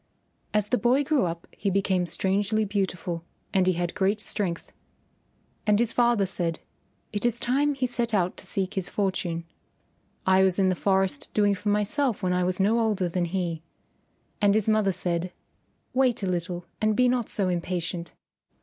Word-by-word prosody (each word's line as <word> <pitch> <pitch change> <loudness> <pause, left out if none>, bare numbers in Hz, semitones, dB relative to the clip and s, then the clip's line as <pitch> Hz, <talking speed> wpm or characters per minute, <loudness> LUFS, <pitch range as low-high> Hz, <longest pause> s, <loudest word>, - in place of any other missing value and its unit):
As 210 -1 +1
the 250 - +2
boy 255 +4 +3
grew 285 -6 +2
up 170 0 -5
he 200 - -2
became 190 -2 +1
strangely 205 +4 0
beautiful 180 -4 -2 0.3
and 190 -2 +3
he 185 - +4
had 175 0 -2
great 205 +1 +1
strength. 195 -5 -2 1.0
And 210 -1 +5
his 230 0 +1
father 235 -4 +3
said, 170 -3 -2 0.5
"It 205 - -2
is 240 -1 +1
time 280 +4 +1
he 265 -1 0
set 240 -2 -2
out 185 -4 +1
to - - -10
seek 195 -2 -2
his 190 -2 -2
fortune. 180 -4 -1 0.8
I 190 0 +5
was 190 -2 +3
in 190 -1 +3
the - - +3
forest 190 -5 0
doing 205 -1 +4
for 205 +2 -3
myself 210 +3 0
when 180 -1 +1
I 180 0 +1
was 180 +1 -1
no 215 +4 +3
older 210 -5 +1
than 175 +1 0
he." 170 -2 -2 0.8
And 205 0 +4
his 215 -1 +2
mother 215 -2 +3
said, 175 0 -2 0.6
"Wait 255 -5 +2
a - - 0
little 175 0 -2 0.2
and 215 0 +2
be 250 +3 +4
not 245 -2 0
so 195 -3 0
impatient. 175 -1 -3
195 Hz, 175 wpm, -26 LUFS, 180-215 Hz, 1.0 s, And